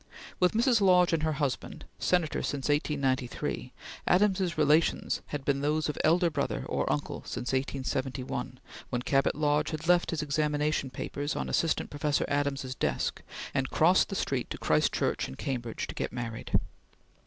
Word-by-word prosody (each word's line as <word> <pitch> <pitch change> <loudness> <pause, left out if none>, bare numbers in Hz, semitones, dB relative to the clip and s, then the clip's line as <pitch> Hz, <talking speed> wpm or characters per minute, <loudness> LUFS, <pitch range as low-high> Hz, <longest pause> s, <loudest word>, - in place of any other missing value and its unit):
With 180 -1 +3
Mrs. 235 0 +3
Lodge 180 -3 +5
and 165 - +2
her 155 0 +1
husband, 145 -3 -3
Senator 175 -4 +1
since 140 0 -2
1893, 140 -4 -1 0.4
Adams's 185 -2 +3
relations 155 +2 +2
had 145 -2 -5
been 140 -1 +1
those 150 +2 +1
of 150 - -3
elder 170 +2 +4
brother 145 -2 -2
or - - 0
uncle 75 0 -2
since 120 - -4
1871 130 -1 -2 0.3
when 125 - -1
Cabot 135 +1 +2
Lodge 150 0 +1
had 155 +1 -5
left 175 0 +4
his 160 -2 -1
examination 150 -1 0
papers 145 +3 -4
on - - -3
Assistant 165 - 0
Professor 145 0 0
Adams's 140 -2 -1
desk, 70 - -1 0.3
and - - 0
crossed - - +4
the - - -3
street - - -1
to - - -5
Christ - - +2
Church - - 0
in 65 - -8
Cambridge 120 - -3
to - - -7
get - - -3
married. 115 -1 -1
145 Hz, 160 wpm, -29 LUFS, 135-160 Hz, 0.4 s, Lodge